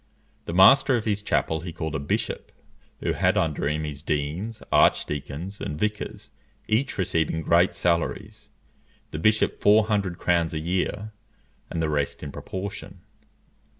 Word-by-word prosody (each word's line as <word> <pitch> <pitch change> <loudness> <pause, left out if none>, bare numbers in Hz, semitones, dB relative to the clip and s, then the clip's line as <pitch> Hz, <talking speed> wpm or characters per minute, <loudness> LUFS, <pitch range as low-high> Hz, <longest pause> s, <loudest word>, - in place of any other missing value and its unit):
The - - -4
master 135 +8 +7
of 115 - -2
his 105 -2 0
chapel 80 -5 0
he 85 +2 -6
called 80 -2 -4
a 75 - -1
bishop, 70 - -3 0.5
who - - 0
had - - +2
under 75 -3 0
him 75 +1 -1
his 75 -2 -6
deans, 80 +10 -3
arch - - +4
deacons, 75 +7 -6
and 75 - -4
vicars, 105 +4 -3 0.4
each 110 +6 0
receiving 80 -3 0
great 85 +3 +3
salaries; 85 -1 -1 0.6
the 75 - -4
bishop 110 +6 +2
four 105 +1 +5
hundred 100 -5 -1
crowns 85 -2 +1
a - - -1
year, 95 +5 -2 0.6
and 80 - -2
the - - +1
rest 75 -1 -2
in 75 - -5
proportion. 95 0 -7
85 Hz, 150 wpm, -25 LUFS, 75-105 Hz, 0.6 s, master